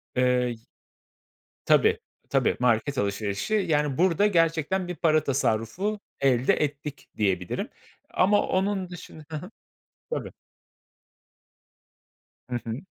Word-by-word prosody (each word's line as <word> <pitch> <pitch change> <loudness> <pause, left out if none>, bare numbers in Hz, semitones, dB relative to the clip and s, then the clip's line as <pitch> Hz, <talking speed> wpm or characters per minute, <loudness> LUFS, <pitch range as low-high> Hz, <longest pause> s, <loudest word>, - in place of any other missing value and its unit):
Eee 125 -2 +2 1.1
Tabii - - +4 0.3
tabii, - - +2
market 125 +3 +2
alışverişi, 100 - -1
yani, 150 -9 +1
burada 185 +3 +4
gerçekten 165 0 +1
bir 180 - -4
para 155 -1 +3
tasarrufu 140 - 0 0.2
elde 130 -2 +3
ettik, 145 0 -3
diyebilirim. 95 -4 -1 0.4
Ama 205 +3 +4
onun 190 -1 0
dışın 170 -3 -10
Hı 155 - -5
hı. - - -6 0.7
Tabii. - - -3 2.2
Hı 125 - -2
hı. 115 0 -3
150 Hz, 100 wpm, -26 LUFS, 125-180 Hz, 2.2 s, Tabii